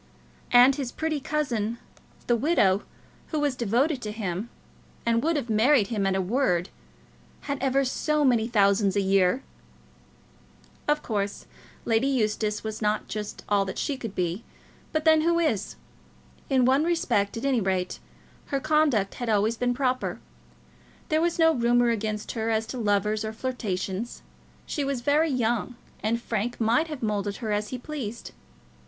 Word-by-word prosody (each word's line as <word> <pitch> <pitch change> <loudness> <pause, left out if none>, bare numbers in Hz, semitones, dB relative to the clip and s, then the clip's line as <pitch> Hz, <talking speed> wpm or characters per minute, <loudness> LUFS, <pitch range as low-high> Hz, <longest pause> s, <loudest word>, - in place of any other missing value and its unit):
And 250 +3 +7
his 265 -4 -3
pretty 315 -2 -2
cousin, 240 -7 -1 0.5
the 240 - +3
widow, 220 - +3 0.5
who 310 - -2
was 290 -3 0
devoted 250 +5 +1
to 210 - -4
him, 210 0 -4 0.6
and 230 0 +2
would 330 +4 +1
have 280 -5 -2
married 225 0 +3
him 205 -4 0
at 190 - +1
a 190 - +1
word, 180 -5 +1 0.7
had 280 -2 -4
ever 270 0 +2
so 300 +3 +1
many 235 -4 +3
thousands 200 -3 +3
a 200 - +3
year! 195 +5 +2 1.4
Of 295 0 +1
course, 200 -3 -3 0.4
Lizzie 225 +3 +2
Eustace 215 -5 0
was 220 0 -5
not 210 0 0
just 210 -1 -5
all 205 -1 +3
that 190 - -5
she 290 - -1
should 225 -6 -7
be; 180 +4 -2 0.5
but 310 0 -1
then 315 -1 +6
who 335 +1 +2
is? 270 - 0 0.7
In 260 -3 +3
one 265 +4 +4
respect, 245 -12 0
at 230 - -4
any 260 -4 +2
rate, 185 -2 -1 0.5
her 275 - -1
conduct 295 -9 +2
had 240 - -2
always 215 +2 +2
been 245 +1 0
proper. 255 -1 -1 0.9
There 310 0 +2
was 340 0 +1
no 325 -1 +5
rumour 240 -1 +3
against 215 -1 -3
her 225 -1 -2
as 220 0 +1
to 255 - -4
lovers 210 0 +1
or 220 0 -4
flirtations. 220 -3 -4 0.4
She 290 - -2
was 275 -3 -2
very 295 +5 +3
young, 240 -2 0 0.3
and 225 +2 0
Frank 235 0 -3
might 235 +8 +2
have 300 -6 -6
moulded 205 -2 -1
her 220 -1 -4
as 210 0 0
he 255 - -4
pleased. 245 -4 -6
235 Hz, 160 wpm, -26 LUFS, 210-275 Hz, 1.4 s, And